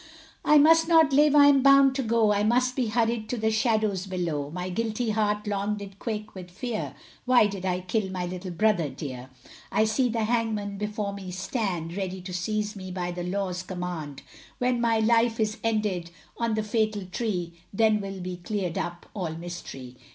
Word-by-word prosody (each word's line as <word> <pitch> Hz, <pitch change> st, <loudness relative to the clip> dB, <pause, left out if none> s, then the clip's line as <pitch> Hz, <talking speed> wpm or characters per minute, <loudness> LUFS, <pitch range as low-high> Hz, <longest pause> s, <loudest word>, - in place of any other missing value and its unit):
I 300 Hz, -, +6 dB
must 325 Hz, +2 st, +6 dB
not 320 Hz, -4 st, +5 dB
live, 295 Hz, +1 st, +5 dB
I 290 Hz, -1 st, +8 dB
am 280 Hz, -1 st, +6 dB
bound 275 Hz, 0 st, +6 dB
to 270 Hz, -, -1 dB
go, 225 Hz, -3 st, +3 dB
I 205 Hz, -, +1 dB
must 250 Hz, +4 st, +2 dB
be 255 Hz, -4 st, 0 dB
hurried 225 Hz, 0 st, 0 dB
to 250 Hz, -, -2 dB
the 220 Hz, 0 st, +1 dB
shadows 215 Hz, -4 st, +1 dB
below, 165 Hz, -6 st, -2 dB
My 180 Hz, +3 st, -4 dB
guilty 225 Hz, +4 st, -1 dB
heart 210 Hz, 0 st, 0 dB
long 205 Hz, 0 st, -1 dB
did 200 Hz, -1 st, -9 dB
quake 215 Hz, -2 st, -4 dB
with 180 Hz, -2 st, -9 dB
fear, 230 Hz, +4 st, -4 dB, 0.3 s
Why 250 Hz, -3 st, +5 dB
did 195 Hz, -2 st, -3 dB
I 180 Hz, 0 st, 0 dB
kill 190 Hz, +2 st, -1 dB
my 185 Hz, -1 st, -3 dB
little 180 Hz, +1 st, -6 dB
brother 175 Hz, -3 st, +1 dB
dear. 130 Hz, -2 st, -7 dB, 0.4 s
I 215 Hz, -, +3 dB
see 245 Hz, +4 st, +1 dB
the 225 Hz, -1 st, -1 dB
hangman 215 Hz, -3 st, -1 dB
before 210 Hz, -1 st, -3 dB
me 195 Hz, -2 st, -7 dB
stand, 180 Hz, -3 st, -3 dB
Ready 190 Hz, -1 st, -3 dB
to 180 Hz, 0 st, -7 dB
seize 210 Hz, +4 st, -2 dB
me 185 Hz, -1 st, -7 dB
by 180 Hz, -1 st, -3 dB
the 175 Hz, 0 st, -5 dB
law's 180 Hz, 0 st, -2 dB
command, 175 Hz, -6 st, -6 dB, 0.3 s
When 250 Hz, -1 st, +1 dB
my 230 Hz, -1 st, +3 dB
life 230 Hz, +1 st, +3 dB
is 215 Hz, -1 st, 0 dB
ended 210 Hz, -6 st, 0 dB, 0.3 s
on 230 Hz, -2 st, -1 dB
the 215 Hz, -, -1 dB
fatal 215 Hz, -2 st, 0 dB
tree, 180 Hz, -3 st, -3 dB, 0.2 s
Then 215 Hz, 0 st, +3 dB
will 195 Hz, -1 st, -6 dB
be 180 Hz, 0 st, -5 dB
clear'd 180 Hz, -2 st, -3 dB
up 175 Hz, 0 st, -5 dB
all 175 Hz, -6 st, -3 dB
mystery. 150 Hz, -7 st, -8 dB
210 Hz, 190 wpm, -26 LUFS, 180-230 Hz, 0.4 s, I